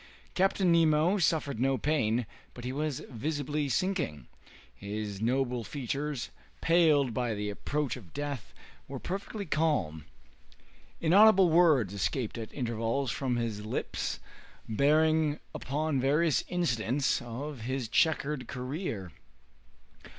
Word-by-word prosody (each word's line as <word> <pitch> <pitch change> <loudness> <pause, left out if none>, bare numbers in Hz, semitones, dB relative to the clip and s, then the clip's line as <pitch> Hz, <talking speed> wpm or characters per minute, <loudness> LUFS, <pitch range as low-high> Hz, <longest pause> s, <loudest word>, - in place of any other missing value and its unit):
Captain 190 -1 +2
Nemo 165 +3 +4
suffered 150 -7 +1
no 135 +1 +2
pain, 125 -6 +1 0.3
but 120 - -8
he 130 - -3
was 150 -1 -2
visibly 145 +3 -2
sinking. 160 - -1 0.5
His 100 0 -5
noble 125 0 0
features, 140 +1 -3 0.3
paled 155 -7 +4
by 120 -2 -1
the 105 0 -3
approach 145 +6 -2
of 100 -11 -12
death, 145 -6 -5 0.4
were 135 - -6
perfectly 200 - -5
calm. 145 - 0 0.9
Inaudible 190 +1 +6
words 155 - +4
escaped 105 - -2
at 110 - -6
intervals 115 +1 -1
from 130 -3 -1
his 115 -3 -2
lips, 110 - -3 0.5
bearing 155 +5 +3
upon 145 +1 -1
various 150 +3 +2
incidents 135 -6 0
of 125 +3 -6
his 130 +1 -2
checkered 150 0 +1
career. 125 - -4
140 Hz, 115 wpm, -30 LUFS, 115-155 Hz, 0.9 s, Inaudible